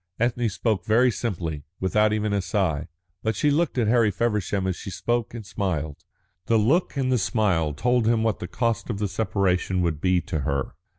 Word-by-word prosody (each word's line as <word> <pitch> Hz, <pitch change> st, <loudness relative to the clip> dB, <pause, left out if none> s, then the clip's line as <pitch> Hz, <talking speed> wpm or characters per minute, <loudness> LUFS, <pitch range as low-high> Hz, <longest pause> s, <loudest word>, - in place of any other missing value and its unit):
Ethne 120 Hz, 0 st, +1 dB
spoke 105 Hz, -2 st, -1 dB
very 120 Hz, +5 st, +4 dB
simply, 85 Hz, -10 st, -3 dB, 0.2 s
without 105 Hz, +3 st, +2 dB
even 105 Hz, -1 st, 0 dB
a 100 Hz, -, +1 dB
sigh, 85 Hz, -5 st, -1 dB, 0.3 s
but 110 Hz, -1 st, -1 dB
she 145 Hz, +8 st, +2 dB
looked 155 Hz, -1 st, +1 dB
at 120 Hz, -, +2 dB
Harry 115 Hz, 0 st, +4 dB
Feversham 100 Hz, -2 st, -1 dB
as 95 Hz, -1 st, 0 dB
she -, -, -7 dB
spoke 120 Hz, +5 st, -2 dB
and 110 Hz, -3 st, -7 dB
smiled. 80 Hz, -8 st, -3 dB, 0.4 s
The 115 Hz, -, +4 dB
look 140 Hz, -, +2 dB
and 130 Hz, -1 st, +1 dB
the 125 Hz, -, +3 dB
smile 95 Hz, -6 st, +1 dB
told 125 Hz, +5 st, +2 dB
him 115 Hz, -1 st, +3 dB
what 110 Hz, -3 st, 0 dB
the 90 Hz, -, -5 dB
cost 115 Hz, +4 st, -1 dB
of 110 Hz, -, -2 dB
the 105 Hz, 0 st, -1 dB
separation 95 Hz, -3 st, 0 dB
would 80 Hz, -3 st, -1 dB
be 90 Hz, -1 st, +3 dB
to 80 Hz, -3 st, -3 dB
her. 70 Hz, -1 st, -2 dB
105 Hz, 195 wpm, -25 LUFS, 90-115 Hz, 0.4 s, very